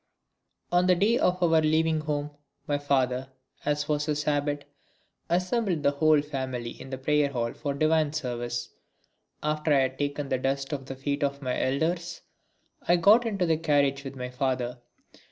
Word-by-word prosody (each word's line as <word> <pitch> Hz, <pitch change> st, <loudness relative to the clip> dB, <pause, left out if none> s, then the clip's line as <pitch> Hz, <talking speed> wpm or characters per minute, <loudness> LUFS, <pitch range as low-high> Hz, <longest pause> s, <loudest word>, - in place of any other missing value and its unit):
On 175 Hz, +1 st, +3 dB
the 180 Hz, -, +5 dB
day 220 Hz, +7 st, +2 dB
of 180 Hz, 0 st, +1 dB
our 165 Hz, -2 st, +4 dB
leaving 160 Hz, +1 st, +2 dB
home 150 Hz, -1 st, -2 dB, 0.3 s
my 145 Hz, -1 st, 0 dB
father, 130 Hz, -2 st, 0 dB, 0.4 s
as 145 Hz, 0 st, 0 dB
was 150 Hz, 0 st, 0 dB
his 150 Hz, -1 st, 0 dB
habit, 145 Hz, -1 st, -1 dB, 0.6 s
assembled 180 Hz, -1 st, 0 dB
the 140 Hz, -, +4 dB
whole 150 Hz, 0 st, +3 dB
family 130 Hz, -5 st, -4 dB
in 130 Hz, -, -11 dB
the 130 Hz, -, -4 dB
prayer 145 Hz, +2 st, +2 dB
hall 120 Hz, -3 st, -2 dB
for 140 Hz, -2 st, -3 dB
divine 155 Hz, 0 st, +2 dB
service. 120 Hz, -4 st, -3 dB, 0.7 s
After 150 Hz, +1 st, 0 dB
I 140 Hz, -2 st, +5 dB
had 130 Hz, 0 st, -2 dB
taken 145 Hz, 0 st, -2 dB
the 130 Hz, -, 0 dB
dust 135 Hz, +1 st, -1 dB
of 135 Hz, -2 st, -5 dB
the 135 Hz, -, -5 dB
feet 140 Hz, +2 st, -2 dB
of 140 Hz, 0 st, -2 dB
my 125 Hz, -1 st, -1 dB
elders 170 Hz, +6 st, -1 dB, 0.7 s
I 175 Hz, -, +5 dB
got 210 Hz, +7 st, +5 dB
into 200 Hz, -5 st, 0 dB
the 160 Hz, -2 st, +2 dB
carriage 140 Hz, -3 st, +1 dB
with 135 Hz, -1 st, -7 dB
my 125 Hz, -1 st, -5 dB
father. 125 Hz, -2 st, -2 dB
145 Hz, 170 wpm, -27 LUFS, 135-160 Hz, 0.7 s, the